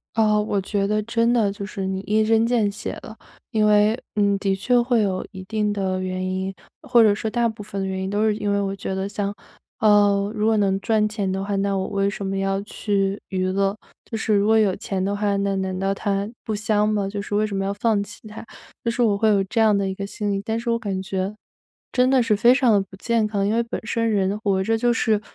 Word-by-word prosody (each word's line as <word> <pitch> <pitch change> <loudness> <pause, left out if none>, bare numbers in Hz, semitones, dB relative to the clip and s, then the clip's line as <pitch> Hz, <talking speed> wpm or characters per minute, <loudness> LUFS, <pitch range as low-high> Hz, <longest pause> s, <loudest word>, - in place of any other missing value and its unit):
啊， 215 -1 +3
我 210 -1 -1
觉 195 +1 -1
得 215 0 +1
真 230 +1 +1
的 220 -5 +2
就 200 0 -7
是 195 -1 -5
你 190 0 -2
一 215 +2 +1
针 225 0 +3
见 230 -4 +2
血 200 - -5
了。 220 - -10 0.4
因 215 -1 +3
为， 210 +2 +4 0.2
嗯， 200 -1 +3
的 195 -1 0
确 245 +4 +2
会 240 -2 +2
有 190 -2 -1
一 190 -2 -9
定 210 +1 -1
的 190 -2 -1
原 185 0 -3
因， 190 +1 -2 0.3
或 255 -5 +4
者 210 -2 +5
说 220 +1 -3
大 235 0 +1
部 215 -1 -7
分 200 -1 -5
的 190 - -2
原 190 0 -3
因 190 - -3
都 210 +2 +1
是 215 - +2
因 205 -1 -2
为 200 - +1
我 195 0 -2
觉 195 0 -5
得 190 +1 -2
像 200 0 -3 0.5
呃， 205 -1 +4
如 215 -1 0
果 225 0 +3
能 195 -2 +2
赚 215 -1 +1
钱 205 -3 -2
的 195 +1 -2
话， 200 0 -2
那 195 0 0
我 190 - -1
为 200 0 0
什 200 -1 -5
么 195 0 -2
要 195 0 0
去 200 -1 -1
娱 185 -1 -1
乐？ 195 +2 0 0.3
就 225 - -5
是 220 - +1
如 200 0 +3
果 220 - +5
有 205 -4 +3
钱 190 -1 -3
的 200 - -1
话， 205 -1 0
那 200 0 0
难 190 -1 -2
道 195 +1 0
它 200 0 -1 0.2
不 215 - -2
香 210 0 +1
吗？ 205 -2 0
就 200 0 -4
是 205 - -5
为 215 - +2
什 200 -2 -4
么 195 - -1
要 195 - -1
放 210 -1 +1
弃 205 0 -10
它， 215 0 -9 0.4
就 235 - +1
是 235 - -3
我 210 -4 +3
会 220 +2 +2
有 200 -2 +3
这 225 +4 -1
样 215 -2 +4
的 200 -1 0
一 190 - -3
个 200 +1 -5
心 205 0 -3
理。 195 0 -2
但 225 +1 -1
是 235 +1 -2
我 230 - +1
感 195 -4 -3
觉， 190 +1 -3 0.6
真 255 +1 +3
的 265 - +4
是 230 -2 +2
非 235 +4 +5
常 230 -7 +3
不 190 0 -13
健 230 +1 0
康。 200 -2 -1
因 210 - +1
为 235 - +2
本 235 - -5
身 230 +1 0
人 200 -1 +1
活 195 -3 +1
着 225 +3 +1
就 240 +1 +2
是 220 -2 +1
205 Hz, 280 characters per minute, -23 LUFS, 195-220 Hz, 0.6 s, 者